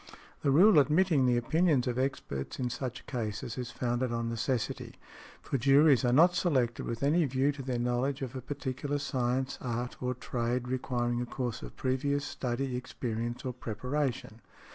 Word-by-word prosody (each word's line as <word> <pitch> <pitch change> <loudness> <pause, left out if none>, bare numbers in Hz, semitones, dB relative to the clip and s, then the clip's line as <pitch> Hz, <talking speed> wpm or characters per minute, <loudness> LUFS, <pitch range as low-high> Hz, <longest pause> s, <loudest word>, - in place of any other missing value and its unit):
The 145 - +1
rule 170 +5 +7
admitting 150 -1 +3
the 120 -1 +3
opinions 155 +2 +2
of 125 -1 -1
experts 100 - -3
in 125 -2 -2
such 130 0 -5
cases 115 -3 -4
is 125 -2 -4
founded 120 0 -1
on 115 0 -1
necessity, 115 +1 -2 0.5
for 135 - -1
juries 140 +1 +5
are 120 - +3
not 165 +7 +6
selected 135 -10 0
with 115 +3 -4
any 160 +5 +4
view 135 +1 +1
to 140 -1 -8
their 130 -2 -2
knowledge 125 +3 0
of 130 0 -5
a 130 - -4
particular 140 +1 -3
science, 130 -2 -1
art 120 0 -4
or 125 0 -1
trade, 125 0 -2
requiring 120 -1 -1
a 125 - -3
course 125 -2 -3
of - - -9
previous 140 +2 0
study, 130 0 -2
experience 120 -1 -4
or 130 - -2
preparation. 125 0 -3
130 Hz, 165 wpm, -30 LUFS, 120-140 Hz, 0.5 s, rule